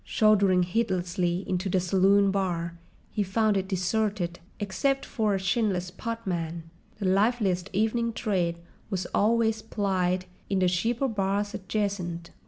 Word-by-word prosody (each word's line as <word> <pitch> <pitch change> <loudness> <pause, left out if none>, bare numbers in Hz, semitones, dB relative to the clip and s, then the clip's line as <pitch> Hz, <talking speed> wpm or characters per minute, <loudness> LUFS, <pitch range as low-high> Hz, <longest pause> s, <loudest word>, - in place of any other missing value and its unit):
Shouldering 200 -4 +4
heedlessly 180 -2 -1
into 185 +1 -1
the 185 - +2
saloon 195 +2 +4
bar, 175 -3 -1 0.4
he 210 - -1
found 210 +2 +2
it 190 -1 0
deserted 190 -1 -1 0.2
except 220 +8 0
for 215 -4 0
a - - -1
chinless 190 -3 0
potman: 180 -6 -4 0.3
the 205 - -4
liveliest 195 -1 +2
evening 225 +4 +1
trade 185 -7 -1 0.3
was 190 -3 -2
always 220 +1 +2
plied 185 -4 0 0.2
in 195 - +1
the 185 -1 +3
cheaper 230 +9 0
bars 205 -2 -1
adjacent. 185 -4 -3
195 Hz, 130 wpm, -27 LUFS, 180-215 Hz, 0.4 s, Shouldering